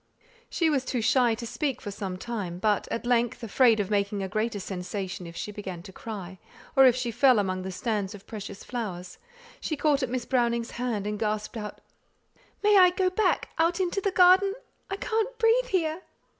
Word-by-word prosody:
She 335 Hz, -, +1 dB
was 275 Hz, -3 st, +1 dB
too 255 Hz, -1 st, -2 dB
shy 240 Hz, 0 st, +3 dB
to 235 Hz, +1 st, -7 dB
speak 275 Hz, +3 st, -2 dB
for 205 Hz, -, -6 dB
some 190 Hz, -2 st, -5 dB
time; 195 Hz, -5 st, -4 dB
but 210 Hz, +2 st, +1 dB
at 230 Hz, -, -3 dB
length, 240 Hz, -1 st, +1 dB
afraid 230 Hz, 0 st, +4 dB
of 205 Hz, 0 st, -2 dB
making 200 Hz, -1 st, 0 dB
a -, -, -2 dB
greater 215 Hz, +2 st, -2 dB
sensation 185 Hz, -1 st, -5 dB
if 170 Hz, -, -10 dB
she 210 Hz, -, -5 dB
began 190 Hz, -4 st, -7 dB
to 190 Hz, 0 st, -11 dB
cry, 190 Hz, -5 st, -7 dB, 0.4 s
or 270 Hz, -1 st, +8 dB
if 245 Hz, -, +5 dB
she 250 Hz, -2 st, -2 dB
fell 250 Hz, +2 st, +5 dB
against 185 Hz, -2 st, 0 dB
the 190 Hz, +1 st, -5 dB
stands 205 Hz, 0 st, -2 dB
of 200 Hz, 0 st, -13 dB
precious 200 Hz, -2 st, -8 dB
flowers, 185 Hz, -8 st, -5 dB, 0.4 s
she 310 Hz, -, -3 dB
caught 290 Hz, -1 st, +2 dB
at 260 Hz, -, -1 dB
Miss 250 Hz, -1 st, -2 dB
Browning's 235 Hz, -2 st, 0 dB
hand, 235 Hz, -5 st, -2 dB
and 210 Hz, 0 st, -3 dB
gasped 215 Hz, 0 st, -2 dB
out 210 Hz, -2 st, -6 dB, 0.8 s
"May 415 Hz, -1 st, +6 dB
I 365 Hz, -1 st, +8 dB
go 365 Hz, +1 st, 0 dB
back, 430 Hz, +3 st, +1 dB
out 335 Hz, +3 st, +2 dB
into 375 Hz, +1 st, 0 dB
the 395 Hz, -, +1 dB
garden? 380 Hz, +2 st, +5 dB, 0.3 s
I 390 Hz, -, -2 dB
can't 445 Hz, +4 st, -2 dB
breathe 465 Hz, +2 st, +3 dB
here!" 335 Hz, -5 st, 0 dB
230 Hz, 200 wpm, -27 LUFS, 200-300 Hz, 0.8 s, or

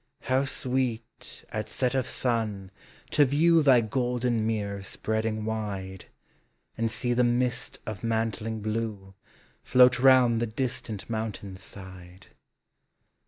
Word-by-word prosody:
How 130 Hz, +2 st, +1 dB
sweet, 130 Hz, -3 st, -2 dB
at 110 Hz, 0 st, -4 dB
set 125 Hz, +2 st, 0 dB
of 130 Hz, -2 st, 0 dB
sun, 110 Hz, -6 st, -1 dB, 0.4 s
to 150 Hz, -, +5 dB
view 160 Hz, +5 st, +4 dB
Thy 135 Hz, -5 st, +6 dB
golden 120 Hz, -1 st, 0 dB
mirror 100 Hz, -3 st, -2 dB
spreading 110 Hz, +2 st, -2 dB
wide, 100 Hz, -4 st, -4 dB, 0.7 s
And 115 Hz, 0 st, 0 dB
see 120 Hz, +2 st, 0 dB
the 125 Hz, +1 st, +3 dB
mist 125 Hz, +1 st, 0 dB
of 110 Hz, -2 st, -6 dB
mantling 110 Hz, -1 st, -1 dB
blue 110 Hz, -3 st, -3 dB, 0.5 s
Float 125 Hz, -1 st, +5 dB
round 125 Hz, -3 st, +5 dB
the 120 Hz, -, 0 dB
distant 110 Hz, -3 st, -4 dB
mountain's 110 Hz, -4 st, -5 dB
side. 95 Hz, -1 st, -11 dB
115 Hz, 120 wpm, -27 LUFS, 105-125 Hz, 0.7 s, Thy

